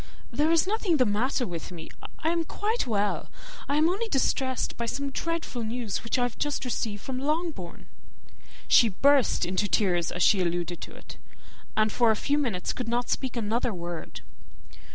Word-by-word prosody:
"There 295 Hz, +6 st, +2 dB
is 330 Hz, 0 st, +4 dB
nothing 390 Hz, -4 st, +1 dB
the 255 Hz, -, +4 dB
matter 245 Hz, +5 st, +1 dB
with 175 Hz, -2 st, -6 dB
me. 165 Hz, -3 st, -8 dB, 0.4 s
I 320 Hz, -, +3 dB
am 335 Hz, 0 st, +1 dB
quite 420 Hz, -, -1 dB
well, 205 Hz, -3 st, 0 dB, 0.4 s
I 285 Hz, -, +2 dB
am 310 Hz, +1 st, +5 dB
only 400 Hz, +7 st, 0 dB
distressed 265 Hz, -, 0 dB
by 235 Hz, -, -3 dB
some 275 Hz, +4 st, -2 dB
dreadful 330 Hz, -5 st, -3 dB
news 225 Hz, -2 st, -3 dB
which 230 Hz, -, -1 dB
I 250 Hz, -, +2 dB
have 245 Hz, -1 st, -3 dB
just 290 Hz, -2 st, -1 dB
received 220 Hz, -4 st, -2 dB
from 260 Hz, -1 st, -4 dB
Longbourn." 300 Hz, -, -2 dB, 0.8 s
She 230 Hz, -, +6 dB
burst 275 Hz, +6 st, +3 dB
into 185 Hz, +3 st, 0 dB
tears 180 Hz, -5 st, +2 dB
as 180 Hz, -, 0 dB
she 200 Hz, -3 st, +5 dB
alluded 175 Hz, -1 st, -1 dB
to -, -, -8 dB
it, -, -, -11 dB, 0.6 s
and 215 Hz, 0 st, +3 dB
for 235 Hz, +1 st, +3 dB
a 220 Hz, -, +4 dB
few 285 Hz, +7 st, +1 dB
minutes 225 Hz, -11 st, -1 dB
could 250 Hz, -, -4 dB
not 240 Hz, +1 st, 0 dB
speak 255 Hz, -2 st, -1 dB
another 230 Hz, 0 st, 0 dB
word. 170 Hz, -1 st, -6 dB
245 Hz, 180 wpm, -27 LUFS, 205-290 Hz, 0.8 s, She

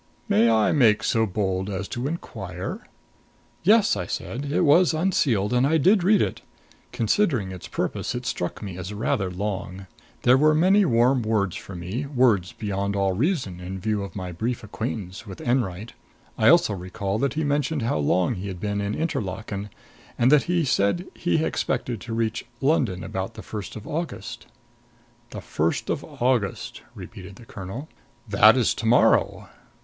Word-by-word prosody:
May 115 Hz, +3 st, +4 dB
I 110 Hz, -2 st, +3 dB
make 115 Hz, -8 st, +4 dB
so 110 Hz, -1 st, +2 dB
bold 95 Hz, -1 st, -1 dB
as 95 Hz, 0 st, -3 dB
to 120 Hz, +3 st, -3 dB
inquire 95 Hz, -, -6 dB, 0.4 s
" -, -, -36 dB
"Yes," 210 Hz, +3 st, +5 dB, 0.2 s
said 135 Hz, +5 st, -4 dB
I. -, -, -2 dB
"It 175 Hz, -, +3 dB
was 165 Hz, +3 st, +5 dB
unsealed 135 Hz, -, +1 dB
and 125 Hz, +2 st, +3 dB
I 160 Hz, +2 st, +3 dB
did 190 Hz, +5 st, +4 dB
read 205 Hz, +2 st, +4 dB
it. -, -, -4 dB, 0.5 s
Considering 115 Hz, -, +1 dB
its 90 Hz, -2 st, -8 dB
purpose, -, -, -3 dB
it 125 Hz, 0 st, -5 dB
struck 100 Hz, -4 st, -3 dB
me 95 Hz, -3 st, -6 dB
as 90 Hz, +3 st, -6 dB
rather 100 Hz, -3 st, 0 dB
long. 95 Hz, 0 st, -4 dB, 0.4 s
There 125 Hz, +2 st, +5 dB
were 155 Hz, +1 st, +4 dB
many 190 Hz, +5 st, +4 dB
warm 125 Hz, 0 st, +3 dB
words 105 Hz, -5 st, 0 dB
for 100 Hz, -, -8 dB
me 95 Hz, +11 st, -4 dB
words 120 Hz, -10 st, +2 dB
beyond 100 Hz, -1 st, -3 dB
all 100 Hz, -1 st, +1 dB
reason 125 Hz, -, -1 dB
in 90 Hz, +1 st, -6 dB
view 105 Hz, +1 st, -1 dB
of 100 Hz, -, -7 dB
my 95 Hz, -2 st, -5 dB
brief 115 Hz, +7 st, -3 dB
acquaintance 110 Hz, -2 st, -5 dB
with 95 Hz, -, -9 dB
Enwright. 115 Hz, -4 st, -1 dB, 0.4 s
I -, -, +2 dB
also -, -, +5 dB
recall 95 Hz, +2 st, -3 dB
that 140 Hz, +3 st, 0 dB
he 160 Hz, -, 0 dB
mentioned 145 Hz, -1 st, 0 dB
how 115 Hz, -9 st, 0 dB
long 85 Hz, +4 st, +2 dB
he 95 Hz, +2 st, -6 dB
had 95 Hz, -3 st, -6 dB
been 100 Hz, +1 st, -2 dB
in 100 Hz, +1 st, -2 dB
Interlaken, 105 Hz, -, -3 dB, 0.5 s
and 120 Hz, +3 st, +4 dB
that 150 Hz, -2 st, +5 dB
he 175 Hz, -3 st, +2 dB
said 135 Hz, -, +1 dB
he 160 Hz, -2 st, 0 dB
expected 120 Hz, -4 st, -2 dB
to 115 Hz, -, -6 dB
reach 115 Hz, -1 st, -1 dB, 0.2 s
London 130 Hz, -, +1 dB
about 95 Hz, 0 st, -4 dB
the -, -, -9 dB
first 105 Hz, -2 st, -7 dB
of 110 Hz, -, -8 dB
August." 165 Hz, +2 st, -5 dB, 0.8 s
"The -, -, -7 dB
first 80 Hz, +2 st, -1 dB
of -, -, -2 dB
August," 120 Hz, -5 st, -1 dB
repeated 95 Hz, +1 st, -10 dB
the 115 Hz, -, -14 dB
colonel. 105 Hz, +9 st, -7 dB, 0.4 s
"That -, -, +6 dB
is -, -, +2 dB
to -, -, -4 dB
morrow. -, -, +3 dB
110 Hz, 175 wpm, -24 LUFS, 95-135 Hz, 0.8 s, That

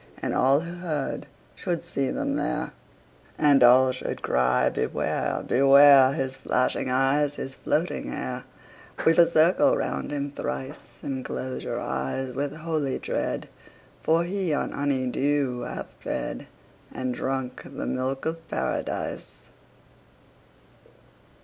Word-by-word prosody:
And -, -, -2 dB
all 135 Hz, +3 st, +4 dB
who 170 Hz, +1 st, -7 dB
heard 155 Hz, -6 st, -3 dB, 0.3 s
should 175 Hz, -2 st, -3 dB
see 140 Hz, -6 st, -1 dB
them 280 Hz, 0 st, -2 dB
there, -, -, -2 dB, 0.7 s
And 145 Hz, -3 st, +5 dB
all 130 Hz, +2 st, +7 dB
should 130 Hz, -, -5 dB
cry, 65 Hz, 0 st, +2 dB
Beware! -, -, -1 dB
Beware! 140 Hz, 0 st, +7 dB
His 135 Hz, -2 st, -2 dB
flashing 125 Hz, 0 st, 0 dB
eyes, 135 Hz, +3 st, +2 dB
his 135 Hz, -, -5 dB
floating 160 Hz, +5 st, -1 dB
hair! 65 Hz, -, -4 dB, 0.5 s
50 -, -, -5 dB
Weave 165 Hz, -, +2 dB
a 170 Hz, -, +8 dB
circle 170 Hz, +2 st, +4 dB
round 70 Hz, -, -3 dB
him 145 Hz, -1 st, -3 dB
thrice, 65 Hz, -, -6 dB
And 130 Hz, -2 st, -3 dB
close 130 Hz, +1 st, -5 dB
your -, -, -3 dB
eyes 65 Hz, -, -3 dB
with 145 Hz, +2 st, -3 dB
holy 155 Hz, -4 st, -2 dB
dread, -, -, -3 dB, 0.5 s
For 165 Hz, +1 st, +3 dB
he 185 Hz, -1 st, -2 dB
on -, -, -2 dB
honey 140 Hz, -2 st, 0 dB
dew 135 Hz, -1 st, 0 dB
hath -, -, -6 dB
fed, -, -, -4 dB, 0.4 s
And 130 Hz, -1 st, -3 dB
drunk 130 Hz, 0 st, -3 dB
the -, -, -6 dB
milk 130 Hz, +1 st, -2 dB
of 165 Hz, 0 st, -4 dB
Paradise. -, -, -3 dB
135 Hz, 130 wpm, -26 LUFS, 130-155 Hz, 0.7 s, a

